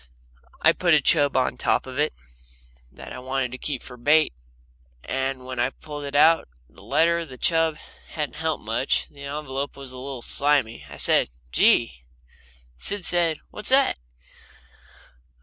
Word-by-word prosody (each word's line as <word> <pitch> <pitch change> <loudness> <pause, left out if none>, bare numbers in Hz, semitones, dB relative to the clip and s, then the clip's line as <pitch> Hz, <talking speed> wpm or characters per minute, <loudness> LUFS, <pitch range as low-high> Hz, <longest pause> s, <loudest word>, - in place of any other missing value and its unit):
I 160 - +7
put 170 -1 +3
a - - +5
chub 145 -1 +3
on 130 - 0
top - - +1
of 130 +1 -7
it 150 +1 +2 0.8
that - - -11
I - - -7
wanted 130 -1 -2
to 130 - -8
keep 140 -4 -4
for 125 - -11
bait, 150 - +3 0.7
and 135 -1 -3
when 130 -1 -6
I 120 +1 +2
pulled 145 +1 -9
it 140 0 -6
out 160 +3 +5 0.2
the 95 - -19
letter 165 +9 +2
the 130 -5 -11
chub 165 0 +1 0.3
hadn't 150 -3 -5
helped 160 -5 -2
much. 115 +5 0
The 140 -1 -11
envelope 140 -1 -5
was 135 -2 -9
a 130 - -9
little 130 -2 -6
slimy. 140 -5 +1
I - - -10
said: - - +5 0.2
"Gee!" - - +3 0.7
Sid 200 - 0
said: 170 -3 +1
"What's 210 - -1
that?" 270 +1 +3
140 Hz, 160 wpm, -24 LUFS, 130-160 Hz, 0.8 s, I